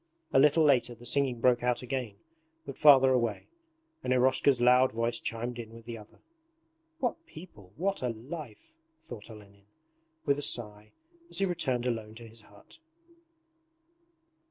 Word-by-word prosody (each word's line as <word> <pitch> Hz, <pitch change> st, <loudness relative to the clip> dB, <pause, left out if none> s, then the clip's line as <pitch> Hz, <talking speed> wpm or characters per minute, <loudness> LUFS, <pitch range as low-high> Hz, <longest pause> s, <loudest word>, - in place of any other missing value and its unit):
A -, -, +5 dB
little 150 Hz, +3 st, +5 dB
later 125 Hz, -4 st, +2 dB
the 120 Hz, +1 st, -15 dB
singing 130 Hz, -1 st, +1 dB
broke 125 Hz, 0 st, +3 dB
out 125 Hz, 0 st, -1 dB
again 125 Hz, -4 st, -4 dB, 0.5 s
but 140 Hz, -, -7 dB
farther 135 Hz, -3 st, +6 dB
away, 120 Hz, -4 st, -1 dB, 0.5 s
and -, -, -2 dB
Eroshka's 130 Hz, +1 st, +3 dB
loud 125 Hz, +1 st, +4 dB
voice 115 Hz, +1 st, -1 dB
chimed 120 Hz, +1 st, -4 dB
in 115 Hz, -1 st, -9 dB
with 115 Hz, -1 st, -13 dB
the 120 Hz, 0 st, -6 dB
other. 105 Hz, -1 st, -14 dB, 0.8 s
'What 275 Hz, +3 st, -3 dB
people, 105 Hz, -, -14 dB
what 195 Hz, +4 st, -2 dB
a 125 Hz, -, -1 dB
life!' 130 Hz, -, -9 dB, 0.3 s
thought 110 Hz, -3 st, -11 dB
Olenin 100 Hz, -2 st, -15 dB, 0.6 s
with 140 Hz, +1 st, +1 dB
a -, -, -4 dB
sigh 105 Hz, -5 st, -3 dB, 0.4 s
as -, -, -7 dB
he 195 Hz, -, +2 dB
returned 135 Hz, -9 st, -1 dB
alone 110 Hz, -3 st, -3 dB
to 115 Hz, 0 st, -11 dB
his 115 Hz, 0 st, -10 dB
hut. 105 Hz, -, -18 dB
120 Hz, 155 wpm, -29 LUFS, 115-135 Hz, 0.8 s, farther